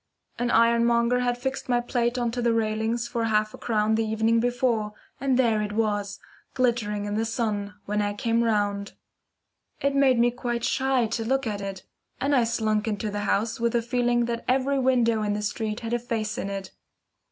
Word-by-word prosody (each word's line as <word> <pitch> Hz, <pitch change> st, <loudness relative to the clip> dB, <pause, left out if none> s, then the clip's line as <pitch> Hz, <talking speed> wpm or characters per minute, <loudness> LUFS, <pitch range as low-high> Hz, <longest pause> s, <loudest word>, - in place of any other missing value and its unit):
An 240 Hz, 0 st, 0 dB
ironmonger 235 Hz, +1 st, +3 dB
had 245 Hz, -1 st, 0 dB
fixed 265 Hz, +1 st, -4 dB
my 245 Hz, -1 st, +3 dB
plate 240 Hz, 0 st, -1 dB
on 240 Hz, -2 st, 0 dB
to 245 Hz, +1 st, -3 dB
the 235 Hz, -1 st, +2 dB
railings 225 Hz, +1 st, 0 dB
for 230 Hz, -1 st, -2 dB
half 215 Hz, -1 st, +1 dB
a -, -, -9 dB
crown 215 Hz, -1 st, +1 dB
the 225 Hz, +1 st, +2 dB
evening 220 Hz, +1 st, +2 dB
before, 240 Hz, -3 st, 0 dB, 0.3 s
and 265 Hz, -1 st, +1 dB
there 230 Hz, -4 st, +3 dB
it 210 Hz, 0 st, -3 dB
was, 205 Hz, -2 st, -1 dB, 0.4 s
glittering 230 Hz, -5 st, 0 dB
in 205 Hz, -, -3 dB
the 220 Hz, +2 st, 0 dB
sun, 210 Hz, -3 st, -2 dB
when 210 Hz, +1 st, 0 dB
I 205 Hz, 0 st, -1 dB
came 230 Hz, +2 st, +1 dB
round. 205 Hz, -2 st, 0 dB, 0.9 s
It 280 Hz, 0 st, +1 dB
made 275 Hz, -2 st, +4 dB
me 240 Hz, +1 st, +4 dB
quite 240 Hz, -1 st, -3 dB
shy 265 Hz, -2 st, +1 dB
to 225 Hz, +1 st, -2 dB
look 270 Hz, +3 st, 0 dB
at 205 Hz, -2 st, -3 dB
it, 195 Hz, -1 st, -6 dB, 0.4 s
and 280 Hz, +1 st, +1 dB
I 245 Hz, -3 st, +4 dB
slunk 220 Hz, -2 st, 0 dB
into 210 Hz, 0 st, -2 dB
the 205 Hz, 0 st, -3 dB
house 225 Hz, +5 st, 0 dB
with 235 Hz, 0 st, 0 dB
a 235 Hz, -, +3 dB
feeling 240 Hz, 0 st, +1 dB
that 235 Hz, 0 st, -3 dB
every 270 Hz, +2 st, +2 dB
window 240 Hz, -4 st, +2 dB
in 210 Hz, -1 st, 0 dB
the 210 Hz, 0 st, -3 dB
street 215 Hz, +1 st, -3 dB
had 230 Hz, 0 st, -4 dB
a 240 Hz, -, +1 dB
face 225 Hz, -3 st, -3 dB
in 200 Hz, -, -3 dB
it. 195 Hz, -1 st, -5 dB
230 Hz, 200 wpm, -26 LUFS, 215-245 Hz, 0.9 s, made